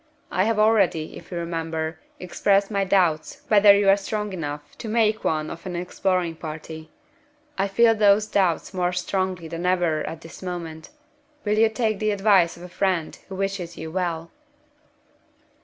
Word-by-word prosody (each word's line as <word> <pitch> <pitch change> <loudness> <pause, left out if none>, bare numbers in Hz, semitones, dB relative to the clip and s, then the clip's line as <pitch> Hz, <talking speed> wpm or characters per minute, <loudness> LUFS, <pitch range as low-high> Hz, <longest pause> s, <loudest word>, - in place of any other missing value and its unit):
I 185 +2 +2
have 225 0 +1
already, 205 -7 +2
if 170 - -12
you 175 - -4
remember, 165 -1 -3 0.2
expressed 195 +3 +1
my 200 -1 +1
doubts 180 -5 +1
whether 205 -1 +7
you 200 -1 +1
are 195 - +7
strong 210 0 -4
enough 145 -4 -6
to - - -6
make 220 -1 +2
one 155 -1 -1
of 165 - -9
an 180 - -4
exploring 180 -1 -1
party. 160 0 -8 0.7
I 195 +1 0
feel 225 +3 +4
those 210 -1 +4
doubts 190 -4 0
more 180 -1 0
strongly 180 -1 -2
than 170 +2 -4
ever 175 -4 +1
at 165 0 -7
this 165 - -12
moment. 170 -3 -6 0.6
Will 210 +1 +1
you 225 0 +5
take 220 -2 -1
the 215 - 0
advice 195 -4 +3
of 175 - -12
a - - -7
friend 180 -3 -1
who 190 - -6
wishes 190 -3 -3
you 160 0 -6
well?" 170 -2 -3
185 Hz, 170 wpm, -24 LUFS, 165-200 Hz, 0.7 s, whether